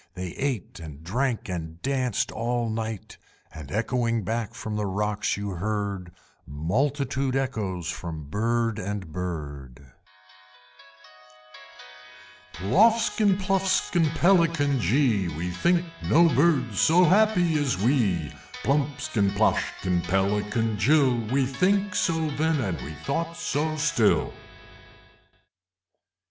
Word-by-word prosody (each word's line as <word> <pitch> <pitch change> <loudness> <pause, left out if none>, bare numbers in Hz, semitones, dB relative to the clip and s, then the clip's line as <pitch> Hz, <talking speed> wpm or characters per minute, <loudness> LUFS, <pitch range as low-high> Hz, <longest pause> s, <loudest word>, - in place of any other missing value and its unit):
They 90 0 -5
ate 120 -3 -4
and 80 -2 -10
drank 120 +7 -1
and 80 -3 -5
danced 130 -5 0
all 120 0 -2
night, 110 -2 -5 0.4
And 75 -2 -9
echoing 115 +1 0
back 110 +2 -3
from 110 -1 -5
the 105 -1 -1
rocks 105 +2 -1
you 100 0 -4
heard 100 -1 -3 0.4
Multitude 130 - -1
echoes 100 -10 -2
from 85 -4 -6
Bird 115 +7 -1
and 100 -4 -5
Bird, 70 -7 -6 2.6
Ploffskin, 205 - +3
Pluffskin, 190 -4 +1
Pelican 165 -6 +3
jee! 110 - +2
We 90 +2 -3
think 175 - +1 0.2
no 170 +2 +6
Birds 135 - +2
so 175 +3 +5
happy 180 -4 +3
as 135 -9 0
we! 100 - +1 0.3
Plumpskin, 140 -6 0
Ploshkin, 95 -4 +1
Pelican 105 +3 0
jill! 135 +2 +4 0.2
We 135 0 +2
think 195 +9 +1
so 160 -3 0
then, 160 0 +1
and 95 - -2
we 75 - -7
thought 165 - -2
so 155 +3 -1
still! 150 -8 +2
115 Hz, 105 wpm, -25 LUFS, 95-150 Hz, 2.6 s, no